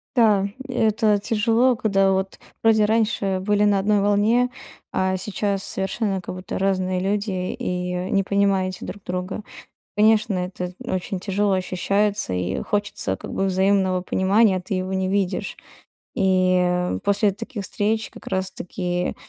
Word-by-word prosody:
Да, 210 -5 +4 0.2
и - - -4
это 215 -2 +2
тяжело. 225 +4 +2
Когда 195 -4 +2
вот 190 0 -2 0.2
вроде 220 -1 +5
раньше 210 -3 +1
были 205 +1 +2
на 205 -1 +3
одной 205 +1 +2
волне, 210 +5 +3 0.4
а 190 0 +1
сейчас 200 0 -2
совершенно 195 0 -2
как 180 - -7
будто 185 0 -5
разные 185 -1 0
люди 200 +2 -1 0.2
и 180 0 -3
не 195 - +2
понимаете 195 -2 0
друг 205 - -8
друга. 180 +3 -4 0.5
Конечно, 215 0 +4
это 180 0 -4
очень 185 0 -3
тяжело 200 +1 0
ощущается, 195 - 0
и 90 +1 -2
хочется 205 - -1
как - - -9
бы 195 - -1
взаимного 190 -1 +2
понимания, 190 +2 +3
а - - -2
ты 185 +2 -4
его 185 +1 -2
не 190 0 0
видишь. 195 0 -1 0.6
И, 185 -1 +3
э, 180 - 0
после 200 0 +3
таких 210 0 -6
встреч 215 +3 -1
как - - -14
раз 190 0 -1
таки 180 -1 -3
195 Hz, 150 wpm, -23 LUFS, 185-210 Hz, 0.6 s, вроде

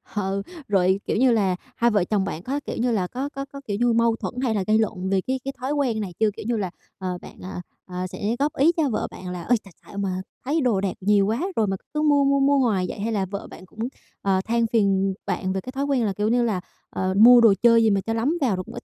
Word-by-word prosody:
Ừ, 195 -1 -1 0.3
rồi, 190 -1 +2
kiểu - - 0
như 255 0 +4
là, 195 -5 +2 0.2
hai 235 0 +2
vợ 205 -4 +3
chồng 195 0 0
bạn 170 -1 -5
có, 280 +3 -2
kiểu - - -4
như 245 +1 +1
là, 195 -5 0
có 265 +8 -4
có 275 -1 -6
có, 280 0 -11
kiểu 205 -1 -1
như, 240 -1 +3
mâu 230 0 +3
thuẫn - - -5
hay 225 -4 +1
là 195 - 0
gây 215 +1 +4
lộn 190 -4 -1
về 195 -1 +2
cái 260 0 0
cái 275 - -3
thói 260 +4 -3
quen 260 -7 0
này 195 -4 -4
chưa? 220 -1 +4
Kiểu - - -7
như 235 -1 0
là, 190 -4 -2 0.3
ờ, 185 -1 -3
bạn, - - -13
à, 185 -1 -6 0.2
à, 180 0 -4
sẽ 210 +4 -2
góp 290 +1 0
ý 300 +5 +5
cho 300 -4 +2
vợ 220 - -1
bạn 180 - -8
là 180 -1 -5
"Ơi, 245 +5 +3
tại 195 -4 -16
xạo 200 - -11
mà 185 -2 -2 0.2
thấy 305 +3 +1
đồ 220 -7 +2
đạc 195 -2 -1
nhiều 200 0 +3
quá 225 +7 -1
rồi 215 -2 +2
mà 195 0 -1 0.2
cứ 300 - 0
mua 290 -2 +4
mua 275 0 +3
mua 280 +1 +4
hoài 220 -9 +2
vậy?" - - -6
hay 225 +3 -1
là 200 -3 0
vợ 200 +2 -6
bạn 185 - -12
cũng, 215 - -20 0.4
ờ, 190 -1 +1
than 235 +1 +1
phiền 195 -3 +2
bạn 185 -2 -2
về 190 - -2
cái 255 - -8
thói 270 +1 -2
quen 270 -5 +1
là 200 - 0
kiểu 210 +2 -1
như 240 +1 +3
là 205 -6 0 0.3
"Ờ, 185 0 -1
mua 240 +3 +9
đồ 225 -3 +7
chơi 230 -1 +6
gì 220 - +4
mà 200 -1 +2
cho 225 - -3
lắm 265 +10 0
vào 235 -8 +2
rồi 185 - -4
cũng - - -12
ít - - -8
220 Hz, 290 wpm, -24 LUFS, 195-250 Hz, 0.4 s, mua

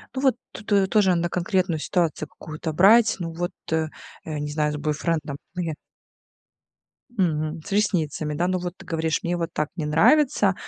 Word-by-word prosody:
Ну, 260 - -1
вот 265 -3 +4 0.2
т - - -9
ту, 205 - 0
э, 195 -1 +4
тоже 195 -4 +4
надо 170 0 0
конкретную 180 -1 0
ситуацию 170 0 0
какую-то 155 0 -6
брать. 210 +8 +6
Ну 165 -1 -3
вот, 175 +3 -3 0.2
э, 160 -1 +1 0.4
э, 155 -2 -4
не 150 - -3
знаю, 150 0 0
с 150 - -3
бойфрендом, 150 0 -2 0.2
ну, 180 - -2
я 160 -2 -2 1.4
Мгм. 155 -4 0
С - - -8
ресницами, 165 -7 0
да. 170 +4 0
Ну 185 0 0
вот 180 0 -5
ты - - -14
говоришь: 160 -2 -1
"Мне 175 +1 -1
вот 170 -1 -2
так 150 -3 -1
не 160 - -2
нравится, 200 - +4
170 Hz, 190 wpm, -24 LUFS, 155-185 Hz, 1.4 s, брать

